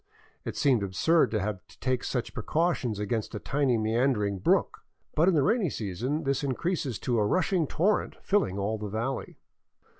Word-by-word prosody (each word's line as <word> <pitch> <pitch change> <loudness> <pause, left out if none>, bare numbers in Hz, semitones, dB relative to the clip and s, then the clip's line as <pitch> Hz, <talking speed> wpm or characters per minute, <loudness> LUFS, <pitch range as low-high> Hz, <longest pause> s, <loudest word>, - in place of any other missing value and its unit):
It - - -5
seemed 130 -6 +3
absurd 100 - +2
to 110 0 0
have 100 -1 -2
to - - -19
take 130 -1 0
such 125 -3 -3
precautions 155 - 0
against 105 +2 -2
a - - -3
tiny 135 -2 +1
meander 110 +1 +1
ing 100 -1 -2
brook, - - +2 0.3
but 165 +4 +3
in 185 - +2
the 145 - +3
rainy 215 - +2
season 120 - -3
this 140 0 0
increases 140 - -1
to 120 -3 0
a - - +3
rushing 180 - +1
torrent 200 +9 +1
filling 195 - +1
all 105 +2 -1
the 105 -1 -4
valley. 115 +6 -3
125 Hz, 180 wpm, -28 LUFS, 105-155 Hz, 0.3 s, seemed